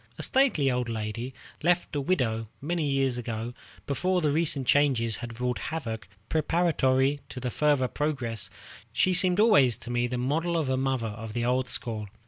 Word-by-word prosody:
A - - -2
stately 245 - +3
old 125 -1 -1
lady, 115 +3 -4 0.3
left 175 -1 +1
a 145 - 0
widow 120 -9 0
many 155 0 -1
years 135 -3 +1
ago, 115 0 -4 0.3
before 180 +6 0
the 150 -4 +1
recent 150 -3 +2
changes 125 -6 +2
had 120 -1 -8
wrought 125 -3 -1
havoc 115 -9 -5 0.2
preparatory 145 -4 +2
to 125 -1 -4
further 145 -3 +2
progress, 120 -9 -2 0.4
she 185 - +2
seemed 180 +1 +5
always 140 - +5
to 120 0 -8
me 120 0 +1
the 125 +1 -3
model 160 +7 0
of 155 -5 -1
a 130 - +2
mother 130 -2 0
of 110 0 -6
the 120 0 -1
old 125 +1 +1
school. 110 -2 -1
130 Hz, 170 wpm, -27 LUFS, 120-155 Hz, 0.4 s, seemed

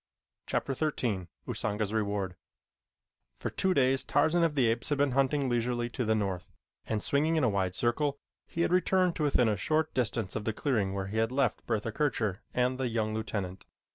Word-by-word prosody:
Chapter 135 - -1
XIII 120 - -1 0.2
Usanga's 105 0 -2
Reward 100 -4 -1 1.0
For - - -4
two 190 -1 +1
days 130 0 +3
Tarzan 170 +2 +3
of 160 -3 +1
the 130 -4 +3
Apes 115 +1 0
had 145 - +1
been 140 -1 +2
hunting 135 +1 +2
leisurely 120 0 0
to 125 - -2
the 110 0 +2
north, 100 -2 -2 0.4
and 110 -2 -1
swinging 155 +3 +2
in 155 - +2
a 125 - +4
wide 95 -3 0
circle, 140 +4 0 0.3
he 170 - -3
had 170 - +2
returned 185 -1 +3
to 155 - -1
within 135 -5 +3
a 105 - +2
short 155 +9 0
distance 115 -5 -1
of 105 - -2
the 110 - 0
clearing 105 -8 0
where 95 -1 -2
he 100 +3 -4
had 115 +1 +2
left 130 -3 0
Bertha 115 -1 -1
Kircher 110 -7 0
and 125 +1 +1
the 130 - 0
young 110 -2 -1
lieutenant. 100 -4 -4
120 Hz, 195 wpm, -30 LUFS, 105-140 Hz, 1.0 s, a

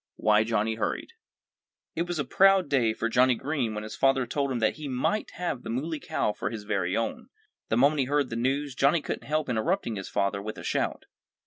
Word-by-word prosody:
II - - -66
WHY 105 0 +5
JOHNNIE 110 0 0
HURRIED 110 - -3 0.8
It 170 +2 -2
was 175 -1 -3
a 145 - -1
proud 195 +2 +4
day 125 -6 +3
for 115 +1 -2
Johnnie 125 +2 +4
Green 130 -4 -2
when 105 - -4
his 110 - -7
father 135 -1 +3
told 140 +3 -1
him 125 - -1
that 110 +3 +1
he 155 -1 -6
might 135 +11 -1
have 170 -8 -3
the - - -8
Muley 150 +7 -2
Cow 105 - -1
for - - -3
his 110 -3 -6
very 100 -4 -1
own. 115 - -3 0.4
The 110 - +2
moment 140 +4 +4
he 135 - +2
heard 145 -1 0
the - - -2
news 135 +4 -1
Johnnie 140 +5 +2
couldn't - - -5
help 155 +1 0
interrupting 125 - -1
his 95 - -6
father 100 0 0
with 110 +1 -6
a - - -8
shout. - - -1
125 Hz, 225 wpm, -27 LUFS, 110-145 Hz, 0.8 s, WHY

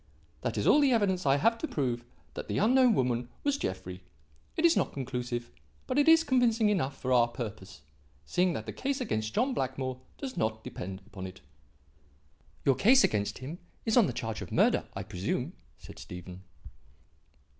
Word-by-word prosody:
That - - -2
is - - 0
all 295 - +6
the 275 -3 +4
evidence 190 -7 +1
I 135 - +5
have 230 +11 +2
to 315 - -2
prove 125 - -2 0.3
that - - -6
the - - -2
unknown 250 +2 +5
woman 125 -3 0
was 285 -1 +1
Jeffrey. 95 0 -4 0.6
It 325 - +3
is 335 - +6
not - - 0
conclusive 125 -2 -4 0.3
but 285 - 0
it 290 - +3
is 325 0 +7
convincing 235 -6 +3
enough 140 -9 0
for 130 0 0
our 120 -1 +5
purpose, 105 - -7 0.4
seeing 180 - +1
that - - -4
the - - -6
case 275 +1 -2
against 110 - -2
John 260 +3 +2
Blackmore 130 - -3 0.2
does 265 -2 -6
not 110 0 -1
depend 95 +1 -7
upon 95 -3 -7
it." 90 -8 -12 1.2
"Your 135 - +5
case 255 - +5
against 105 0 0
him 145 +8 -7 0.3
is 220 - +2
on 235 -7 +6
the - - -1
charge 115 -2 -4
of - - -7
murder, - - +3
I - - -4
presume?" 120 - -3 0.2
said - - -12
Stephen. 90 +1 -9
130 Hz, 180 wpm, -30 LUFS, -, 1.2 s, is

